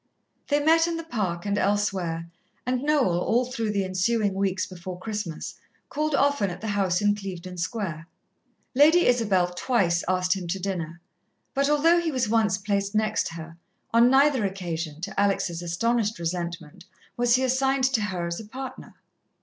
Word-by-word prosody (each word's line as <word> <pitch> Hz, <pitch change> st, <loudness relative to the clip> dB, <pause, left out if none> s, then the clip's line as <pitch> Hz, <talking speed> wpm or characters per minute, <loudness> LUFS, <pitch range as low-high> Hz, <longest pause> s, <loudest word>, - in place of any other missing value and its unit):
They 290 Hz, 0 st, +2 dB
met 325 Hz, +3 st, +4 dB
in 335 Hz, -1 st, -2 dB
the 330 Hz, -, -5 dB
Park 200 Hz, -, -3 dB
and 205 Hz, 0 st, 0 dB
elsewhere, 190 Hz, -5 st, 0 dB, 0.4 s
and 250 Hz, 0 st, 0 dB
Noel, 280 Hz, -, +2 dB
all 235 Hz, +7 st, +1 dB
through 230 Hz, -3 st, -3 dB
the 200 Hz, -2 st, 0 dB
ensuing 200 Hz, +3 st, +1 dB
weeks 190 Hz, -1 st, 0 dB
before 185 Hz, 0 st, -8 dB
Christmas, 200 Hz, -4 st, -5 dB, 0.3 s
called 305 Hz, 0 st, -1 dB
often 280 Hz, -8 st, +2 dB
at 175 Hz, -, -7 dB
the 220 Hz, -, -4 dB
house 195 Hz, -2 st, +1 dB
in 205 Hz, 0 st, +4 dB
Clevedon 185 Hz, -3 st, -7 dB
Square. 170 Hz, -3 st, -3 dB, 0.7 s
Lady 310 Hz, +6 st, +6 dB
Isabel 200 Hz, -8 st, +2 dB
twice 180 Hz, -5 st, +1 dB
asked 185 Hz, 0 st, +2 dB
him 185 Hz, -3 st, -5 dB
to 190 Hz, +3 st, -2 dB
dinner, 170 Hz, -3 st, -4 dB, 0.5 s
but 280 Hz, +1 st, +1 dB
although 325 Hz, +4 st, +4 dB
he 330 Hz, -2 st, -1 dB
was 255 Hz, -4 st, 0 dB
once 215 Hz, -3 st, +2 dB
placed 200 Hz, 0 st, -2 dB
next 215 Hz, -5 st, 0 dB
her, 165 Hz, 0 st, -9 dB, 0.4 s
on 235 Hz, +1 st, +6 dB
neither 270 Hz, -2 st, +4 dB
occasion, 170 Hz, -5 st, -4 dB
to 195 Hz, +2 st, -4 dB
Alex' 200 Hz, -3 st, +1 dB
astonished 215 Hz, +6 st, 0 dB
resentment 170 Hz, 0 st, -5 dB, 0.3 s
was 240 Hz, 0 st, +3 dB
he 260 Hz, -, +1 dB
assigned 265 Hz, +1 st, +1 dB
to 260 Hz, -4 st, +2 dB
her 185 Hz, -4 st, -2 dB
as 170 Hz, 0 st, -3 dB
a 220 Hz, -, -8 dB
partner. 260 Hz, +4 st, -8 dB
205 Hz, 165 wpm, -25 LUFS, 180-250 Hz, 0.7 s, Lady